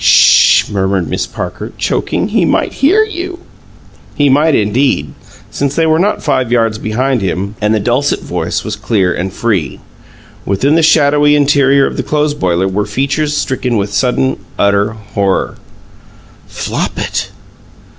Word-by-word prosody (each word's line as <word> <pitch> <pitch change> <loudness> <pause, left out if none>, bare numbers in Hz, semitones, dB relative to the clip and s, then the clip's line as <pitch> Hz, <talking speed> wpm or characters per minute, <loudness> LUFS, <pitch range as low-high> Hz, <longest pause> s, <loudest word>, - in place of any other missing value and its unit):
"'Sh!" - - +5
murmured 95 -3 -1
Miss - - -2
Parcher, - - -6
choking. 195 - -1
"He 215 -3 +1
might - - 0
hear 380 +11 +4
you." 365 -4 -5 0.8
He 145 -1 +2
might, 150 +3 +3
indeed, 105 - 0 0.4
since 140 0 -2
they 165 - +2
were 160 0 +2
not 205 +4 0
five 130 -5 0
yards 115 -3 +1
behind 125 +3 -1
him 95 +1 -3
and 105 0 +1
the 110 - +2
dulcet 125 +7 0
voice - - -3
was 110 - -4
clear 100 -4 0
and 95 +2 -3
free. 95 - -2 0.6
Within 100 +10 0
the 165 - +3
shadowy 150 -1 +4
interior 140 -1 +3
of - - -4
the - - 0
clothes 150 -1 0
boiler 95 -6 0
were 100 +2 -2
features 140 +6 -1
stricken 125 -3 -1
with 100 0 -2
sudden, 130 +1 0 0.2
utter 100 +1 +1
horror. 100 -3 -2 0.9
"FLOPIT!" - - -3
125 Hz, 145 wpm, -13 LUFS, 100-145 Hz, 0.9 s, Sh